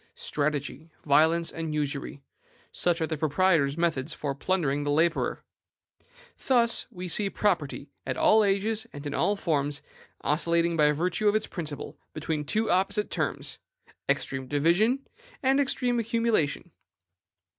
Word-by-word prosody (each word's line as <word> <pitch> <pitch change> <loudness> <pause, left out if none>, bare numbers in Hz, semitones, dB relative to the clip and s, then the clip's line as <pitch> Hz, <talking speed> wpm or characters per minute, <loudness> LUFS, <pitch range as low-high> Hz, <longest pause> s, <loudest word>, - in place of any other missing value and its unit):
Strategy, 145 +1 -3
violence, 160 +3 +3
and 160 -2 -4
usury, 140 -1 -3 0.5
such 175 -1 0
are - - +2
the 160 -2 -4
proprietor's 155 -2 +2
methods 160 -4 0
of 140 -2 -3
plundering 150 -7 0
the 145 - -2
laborer. 160 +3 +1 1.0
Thus 235 -3 +3
we 180 0 -7
see 200 +3 +1
property, 155 -9 -1
at 130 - -3
all 215 0 +5
ages 210 +3 0
and 145 +1 -8
in 145 - -3
all 205 - +2
its 200 - -8
forms, 145 -3 0 0.4
oscillating 170 +2 +1
by 150 -2 +4
virtue 180 +7 +1
of 205 - +1
its 215 - +1
principle 155 -5 -6 0.2
between 155 -1 -2
two 220 +8 0
opposite 195 +3 +1
terms, - - -2 0.5
extreme 135 -1 -1
division 175 - +2 0.4
and 270 +1 +3
extreme 250 -3 +1
accumulation. 230 - 0
165 Hz, 135 wpm, -27 LUFS, 145-205 Hz, 1.0 s, all